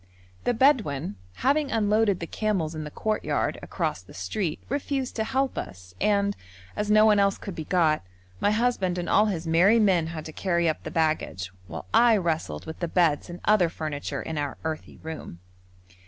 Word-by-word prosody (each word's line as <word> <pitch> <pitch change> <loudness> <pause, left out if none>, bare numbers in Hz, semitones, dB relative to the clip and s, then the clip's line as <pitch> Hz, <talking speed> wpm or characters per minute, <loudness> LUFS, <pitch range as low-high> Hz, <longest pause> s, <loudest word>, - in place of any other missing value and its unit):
The 245 - +2
Bedouin, 215 - +2 0.3
having 285 +1 +3
unloaded 210 -2 +2
the - - -2
camels 185 -5 -1
in 155 -1 -5
the - - -5
courtyard 215 +7 -1
across - - -2
the - - -16
street, 185 -8 -2
refused 275 -1 -2
to 220 - +1
help 265 +3 0
us, 90 0 -9
and, 200 -1 +2 0.4
as 210 0 -2
no 215 0 +6
one 210 -2 +5
else 200 0 +3
could 195 - -7
be 160 -2 -6
got, 160 -4 +2 0.4
my - - +2
husband 215 -5 +1
and 175 - -3
all 215 - +4
his 175 -5 -2
merry 175 +7 +5
men 185 -6 +3
had 160 -2 -6
to 155 - -8
carry 170 -2 +1
up 155 - 0
the - - -6
baggage, 155 - -1 0.2
while 80 0 -7
I 235 -2 +6
wrestled 160 - -2
with 160 - -7
the 170 - -1
beds 165 -2 +2
and 175 +1 -8
other 210 -5 +4
furniture 155 -3 -4
in 160 -2 -4
our 145 -2 -3
earthy 160 -1 -4
room. 160 - -7
180 Hz, 185 wpm, -26 LUFS, 160-215 Hz, 0.4 s, no